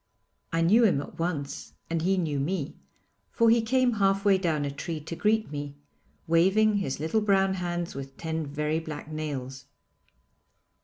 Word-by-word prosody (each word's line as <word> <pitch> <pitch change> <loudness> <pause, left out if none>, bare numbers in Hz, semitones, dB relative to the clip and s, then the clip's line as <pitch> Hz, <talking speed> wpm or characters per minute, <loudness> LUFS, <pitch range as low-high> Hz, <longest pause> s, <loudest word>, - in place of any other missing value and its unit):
I 165 - +1
knew 210 +8 +5
him 190 -10 +4
at 145 - -8
once 145 -5 -3
and 165 -1 -1
he 190 +3 +2
knew 155 -6 -1
me, 155 0 -2 0.5
for 230 -1 +3
he 230 0 +4
came 250 +2 +2
half 195 +1 +2
way 195 -2 +5
down 160 -5 0
a 140 - -2
tree 160 +3 -5
to 160 +3 -6
greet 215 0 +1
me, 145 -1 -5 0.5
waving 195 +6 +3
his 140 -10 -2
little 160 +9 0
brown 195 -2 +3
hands 175 -2 -3
with 135 0 -8
ten 160 -2 -3
very 150 +2 -1
black 155 -1 -7
nails. 135 -4 -5
165 Hz, 165 wpm, -27 LUFS, 145-195 Hz, 0.5 s, knew